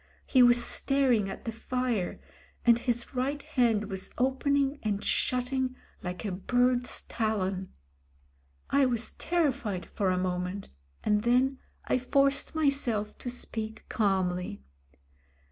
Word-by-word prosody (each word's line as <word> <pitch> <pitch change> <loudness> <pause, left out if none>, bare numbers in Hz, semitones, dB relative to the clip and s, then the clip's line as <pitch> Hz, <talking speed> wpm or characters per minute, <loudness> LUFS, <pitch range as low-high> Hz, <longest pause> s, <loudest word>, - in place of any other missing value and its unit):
He 260 - +4
was 240 0 +6
staring 255 -7 +2
at 195 - -8
the 230 - -2
fire, 235 -4 -2 0.5
and 235 -1 +6
his 240 0 -1
right 270 +3 -1
hand 230 -4 +2
was 190 -2 -2
opening 275 +2 +1
aiid 205 -2 -1
shutting 255 +1 0 0.3
like 180 +3 -5
a 205 - -1
bird's 245 +6 +1
talon. 195 -4 -2 1.0
I 275 -1 +4
was 240 -2 0
terrified 275 - -1
for 195 -2 -1
a 185 - +1
moment, 180 +1 -2 0.3
and 210 -1 +2
then 255 +3 +2 0.3
I - - +1
forced 275 +4 +1
myself 275 -9 +1
to 245 - -4
speak 220 -3 -5
calmly. 180 - 0
240 Hz, 125 wpm, -29 LUFS, 200-260 Hz, 1.0 s, was